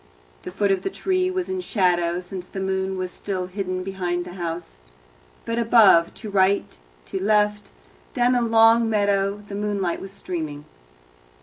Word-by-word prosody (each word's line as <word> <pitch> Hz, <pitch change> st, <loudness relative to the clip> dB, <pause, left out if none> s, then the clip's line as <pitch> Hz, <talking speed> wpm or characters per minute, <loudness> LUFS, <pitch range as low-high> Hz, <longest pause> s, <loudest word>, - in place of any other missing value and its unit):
The -, -, -7 dB
foot 200 Hz, +1 st, +1 dB
of 195 Hz, -, +1 dB
the -, -, -2 dB
tree 370 Hz, -1 st, 0 dB
was 370 Hz, -1 st, -2 dB
in 375 Hz, -1 st, -3 dB
shadow, 180 Hz, -, +1 dB
since 180 Hz, 0 st, -8 dB
the 195 Hz, -, -7 dB
moon 190 Hz, 0 st, -1 dB
was 185 Hz, -1 st, -3 dB
still 190 Hz, -3 st, -4 dB
hidden 185 Hz, -1 st, -4 dB
behind 180 Hz, -2 st, -3 dB
the 180 Hz, -, -9 dB
house. 170 Hz, -, -6 dB, 0.7 s
But 230 Hz, +1 st, -1 dB
above, 215 Hz, -8 st, +5 dB
to 215 Hz, -2 st, -8 dB
right, 195 Hz, 0 st, +2 dB, 0.3 s
to 190 Hz, -, -4 dB
left, 210 Hz, 0 st, +1 dB, 0.5 s
down 245 Hz, -1 st, +3 dB
the 245 Hz, -1 st, +2 dB
long 225 Hz, 0 st, +5 dB
meadow 200 Hz, -1 st, +1 dB
the 200 Hz, -, -9 dB
moonlight 200 Hz, -3 st, -2 dB
was 195 Hz, -, -8 dB
streaming. 155 Hz, -6 st, -6 dB
195 Hz, 165 wpm, -23 LUFS, 180-215 Hz, 0.7 s, above